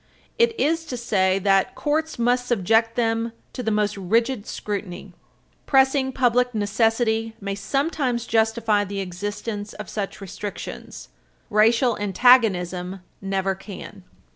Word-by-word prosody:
It 465 -1 +3
is 325 +3 +1
to 250 - -5
say 190 -5 +1
that 195 0 +2
courts 315 +1 -1
must 245 +1 +1
subject 225 +1 +2
them 230 -1 0 0.2
to 255 - -4
the 225 - -1
most 210 -1 +1
rigid 225 +4 0
scrutiny. 200 -2 -5 0.5
Pressing 265 0 +3
public 250 -1 +2
necessity 225 +2 +1
may 200 -1 -3
sometimes 260 +2 -1
justify 225 -2 +2
the 200 0 -5
existence 205 +3 -5
of 210 -2 -8
such 200 -2 -4
restrictions; 200 +1 -7 0.4
racial 230 +3 +3
antagonism 190 -4 +3 0.2
never 195 0 -1
can. 195 0 -10
220 Hz, 120 wpm, -23 LUFS, 200-245 Hz, 0.5 s, It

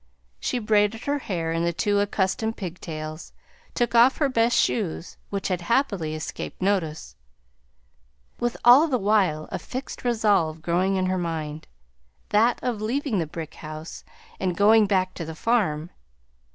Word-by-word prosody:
She - - -1
braided 215 0 +1
her 285 0 -1
hair 170 -9 -3
in 165 0 0
the 170 - +1
two 205 +4 +1
accustomed 205 +2 0
pig 180 -3 -6
tails, 155 0 -7 0.4
took 240 -1 0
off 240 +3 +6
her 290 -3 +2
best 235 -1 +2
shoes 185 -8 -1
(which 200 -1 -2
had 180 -2 -1
happily 195 - 0
escaped 155 - -6
notice), 165 - -1 1.2
with 240 0 -1
all 260 +7 +8
the 265 -5 +1
while 195 -8 +1
a - - -3
fixed 255 +2 -7
resolve 205 -10 +1
growing 185 +3 +1
in 185 -1 +1
her 185 0 0
mind, 160 -3 -4 0.6
that 225 +3 +3
of 235 -4 -2
leaving 240 0 -1
the 165 - -1
brick 160 0 -7
house 155 +1 -8 0.4
and 185 -2 -1
going 215 +1 +5
back 185 -2 +1
to 170 - -6
the 160 0 -7
farm. 175 -8 0
195 Hz, 155 wpm, -25 LUFS, 165-230 Hz, 1.2 s, all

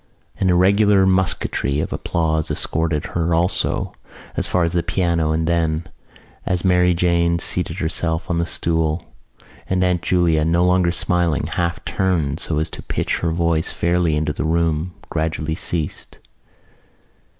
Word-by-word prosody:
An 95 - +2
irregular 100 +2 +4
musketry 95 -6 0
of - - -2
applause 80 -2 -1
escorted 80 -2 -1
her 85 -1 +1
also 85 +2 0 0.4
as - - 0
far 90 - +1
as 85 0 0
the 85 - +2
piano 85 -2 0
and 80 +1 0
then, 80 -1 0 0.6
as 90 0 -1
Mary 90 -1 +4
Jane 85 -1 +2
seated 85 0 -3
herself 80 -1 -1
on 85 -2 0
the 85 - 0
stool, 80 -1 -1 0.6
and 95 0 +2
Aunt 90 -2 +1
Julia, 85 -4 +2
no 85 +2 +2
longer 90 -1 +3
smiling, 85 -3 0
half 85 0 -2
turned 85 -7 0
so 80 - -2
as 80 - -1
to - - -7
pitch - - -2
her 85 - 0
voice 85 -1 0
fairly 85 -2 +1
into 75 0 -1
the - - -3
room, 80 +1 0 0.2
gradually 80 0 -1
ceased. 80 -1 -4
85 Hz, 150 wpm, -20 LUFS, 80-90 Hz, 0.6 s, irregular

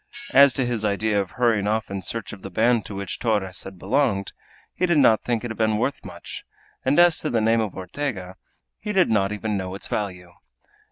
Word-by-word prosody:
As 140 0 +8
to 130 - 0
his 120 -3 -2
idea 105 0 +1
of 95 - -7
hurrying 115 -5 +1
off 110 -1 -1
in 100 -1 -3
search 110 +3 -5
of 100 - -10
the - - -7
band 110 +2 +2
to 100 - -7
which 100 -2 -5
Torres 100 -6 0
had 95 -1 -9
belonged, 105 0 0 0.4
he 180 - 0
did 170 -3 +3
not 115 -6 +5
think 120 -2 -2
it 120 - -4
had 110 - -8
been 110 -1 +2
worth 140 +5 -2
much, - - -9 0.4
and 135 +2 +2
as 175 -2 +5
to 155 - -2
the 115 - +1
name 115 +1 +3
of 105 -4 -4
Ortega, 95 -1 -5 0.4
he 210 -1 -4
did 185 - +3
not 100 -2 +2
even 105 0 -2
know 95 0 -4
its 100 - -6
value. 90 -4 -4
110 Hz, 220 wpm, -23 LUFS, 100-120 Hz, 0.4 s, As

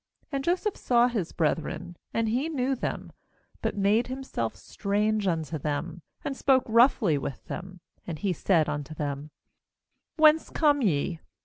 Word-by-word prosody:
7And 275 - 0
Joseph 365 +6 0
saw 240 -1 +3
his 215 -9 -2
brethren, 165 +2 -1 0.2
and 230 0 0
he 255 +8 0
knew 270 -3 0
them, - - -4 0.5
but - - -2
made 205 +4 +3
himself 255 - -3
strange 210 +1 -1
unto 160 -3 -1
them, 155 +4 -3 0.2
and 275 - -2
spoke 265 -1 +3
roughly 225 - +4
with 135 -2 -6
them; 185 -1 -7 0.3
and 165 -3 -4
he 190 +2 0
said 170 -3 +2
unto 145 +1 -4
them: 145 0 -4 0.9
'Whence 310 0 +5
come 290 -3 +3
ye?' 165 - 0
200 Hz, 145 wpm, -27 LUFS, 160-255 Hz, 0.9 s, Whence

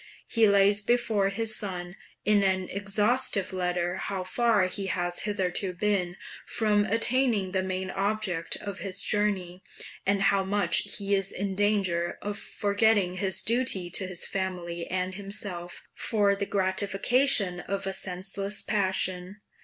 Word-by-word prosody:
He 225 -2 +3
lays 200 +1 +4
before 220 -3 +1
his 220 +2 0
son 180 -3 -4 0.3
in 210 -1 +4
an 190 -1 +1
exhaustive 205 +1 +1
letter 180 -1 -1
how 195 -2 -3
far 215 0 +2
he 195 +1 -3
has 175 -1 -2
hitherto 190 -2 -1
been 180 -2 -1 0.3
from 210 -2 +1
attaining 230 -3 +1
the 190 0 0
main 185 0 -3
object 195 -5 -1
of 200 -1 -6
his 195 -1 +1
journey, 190 -4 -1 0.4
and 200 0 +1
how 195 0 +3
much 200 0 +1
he 200 0 -1
is 195 -1 +1
in 195 +1 -3
danger 190 -4 0
of 205 0 -3
forgetting 205 -3 +1
his 190 -1 0
duty 225 -7 0
to 190 - -1
his 185 -2 -2
family 175 -3 -4
and 185 0 -2
himself, 195 -3 -3
for 205 -3 +2
the 200 0 -3
gratification 200 +2 +2
of 195 +2 -4
a 195 - -2
senseless 195 +2 -3
passion. 190 -1 -1
195 Hz, 140 wpm, -27 LUFS, 185-205 Hz, 0.4 s, lays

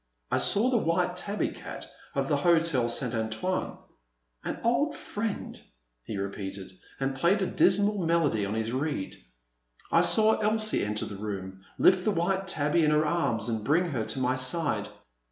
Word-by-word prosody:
I - - +2
saw 225 +6 +3
the 240 - +3
white 180 0 0
tabby 200 +3 -2
cat - - -9 0.3
of - - 0
the - - +2
Hotel 165 -8 +2
St. 120 0 -1
Antoine. 110 +11 -2 0.7
An - - -4
old 285 +6 +1
friend," 210 0 -5 0.4
he 105 - -6
repeated, 100 -1 -5 0.3
and 135 0 -1
played 175 +9 +2
a - - +1
dis 185 +1 +4
mal 205 0 +1
melody 165 - +1
on 100 +2 -2
his 110 0 -2
reed. 130 - -3 0.7
I 165 - +5
saw 215 +6 +5
Elsie 215 0 +1
enter 105 +1 -2
the 100 - -7
room, 95 -2 -6 0.2
lift 185 -1 +4
the - - +1
white 190 +1 0
tabby 155 -1 +2
in 150 - +4
her 150 0 +3
arms 150 -9 0
and 110 -2 -2
bring 160 +9 +2
her 120 -6 -1
to 135 - -3
my 130 0 +1
side. 145 +5 0
160 Hz, 170 wpm, -28 LUFS, 115-190 Hz, 0.7 s, I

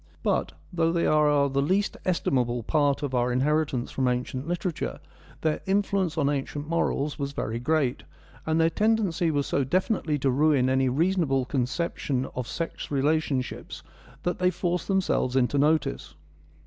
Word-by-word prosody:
But, - - 0 0.2
though 165 -1 +2
they 170 0 +1
are 150 -2 +4
the 135 0 0
least 190 +8 +1
estimable 125 -9 0
part 145 +2 +1
of 140 -2 -3
our 125 0 +1
inheritance 135 -1 0
from 130 -1 0
ancient 125 +2 -2
literature, 175 -1 -3 0.4
their 155 -1 0
influence 195 -3 +1
on 145 -3 +2
ancient 145 +1 -2
morals 155 -3 -1
was 140 0 -3
very 115 -4 -3
great, 135 -1 0 0.4
and 160 +1 0
their 165 0 +3
tendency 205 -5 +1
was 145 -2 0
so 140 - 0
definitely 175 - 0
to 135 -1 +1
ruin 140 -1 +3
any 130 0 +2
reasonable 150 -2 +1
conception 130 0 -1
of 125 -2 -4
sex 165 +4 -5
relationships 145 -2 -1 0.4
that 175 - -1
they 180 0 +3
force 180 -1 -2
themselves 190 -9 +1
into 135 +2 +2
notice. 150 - +1
150 Hz, 150 wpm, -26 LUFS, 130-170 Hz, 0.4 s, are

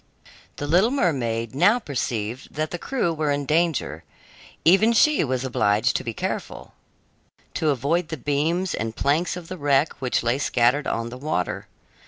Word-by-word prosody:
The 145 - -5
little 180 +9 +4
mermaid 125 - -1
now 180 - +4
perceived 125 - -4
that 155 +1 -2
the 175 - -4
crew 235 -9 -1
were 155 -1 -1
in 145 0 0
danger; 150 - 0 0.6
even 195 +7 +5
she 305 +5 +4
was 130 -2 -1
obliged 110 -2 +1
to - - -1
be 115 - -3
careful, - - -5 0.8
to 155 - 0
avoid 150 +6 0
the 160 +1 -5
beams 155 +7 0
and 110 +1 -3
planks 160 +5 0
of 175 -2 -9
the 185 0 -7
wreck 145 +1 +2
which 125 -2 0
lay 120 +3 +1
scattered 125 +1 +2
on 115 0 -2
the 125 +2 -9
water. 140 - -2
145 Hz, 165 wpm, -24 LUFS, 125-170 Hz, 0.8 s, even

